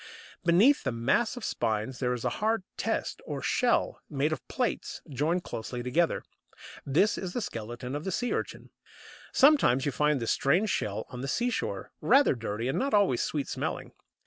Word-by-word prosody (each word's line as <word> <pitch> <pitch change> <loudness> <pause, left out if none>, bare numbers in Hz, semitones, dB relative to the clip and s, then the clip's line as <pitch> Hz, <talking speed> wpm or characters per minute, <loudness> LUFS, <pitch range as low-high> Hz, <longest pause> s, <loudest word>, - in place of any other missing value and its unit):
Beneath 190 +12 +5
the 130 - 0
mass 175 - +1
of 245 - -5
spines 110 +2 -1
there 125 -2 0
is 125 -2 -3
a - - +3
hard 220 -1 +1
test - - -2
or - - -3
shell, 245 -2 +1
made 150 +1 0
of - - -7
plates 250 -3 -2
joined 155 +5 0
closely 120 +2 -5
together; 160 +7 +1 0.6
this 165 +10 +2
is 185 -2 -5
the - - -1
skeleton 120 - -5
of 145 - -4
the 190 - -2
Sea 245 +7 -1
urchin. - - -4 0.6
Sometimes 260 - +5
you 145 - +1
find 150 +1 +2
this 115 - 0
strange 185 +10 +2
shell 105 +1 -2
on 125 - -7
the 135 - -3
seashore, 240 - -2
rather 280 +1 +5
dirty, 115 -1 -3
and 135 +6 0
not 275 -3 +1
always 195 -12 +3
sweet 145 -3 -2
smelling. - - -4
150 Hz, 175 wpm, -29 LUFS, -, 0.6 s, Beneath